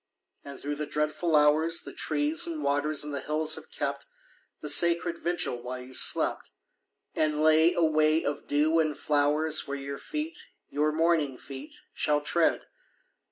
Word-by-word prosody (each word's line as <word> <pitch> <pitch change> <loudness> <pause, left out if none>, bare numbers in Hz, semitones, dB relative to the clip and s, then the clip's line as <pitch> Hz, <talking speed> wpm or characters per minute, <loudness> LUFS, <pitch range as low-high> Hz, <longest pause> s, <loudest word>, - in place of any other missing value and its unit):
And 140 -1 -9
through 145 +1 -4
the 150 0 -4
dreadful 150 +2 -1
hours 155 +3 +3
The - - -9
trees 310 +4 0
and 320 -3 -4
waters 145 +1 0
and 150 0 -6
the 140 - -2
hills 155 +2 0
have - - -7
kept - - -4 0.5
The 150 - -5
sacred 170 +3 +3
vigil 170 -8 -2
while 125 +1 -6
you 130 +1 -13
slept, - - +1 0.6
And 155 -1 +1
lay 155 +2 +5
a 170 - +2
way 155 0 +3
of 145 0 -3
dew 155 +3 +2
and 155 -2 0
flowers 150 +2 +1
Where 140 0 -3
your 140 0 -6
feet, 315 +3 -5 0.3
your 150 +1 +1
morning 155 -4 +1
feet, 135 +3 -9
shall 150 -1 +1
tread. 165 +2 +1
155 Hz, 160 wpm, -28 LUFS, 145-165 Hz, 0.6 s, lay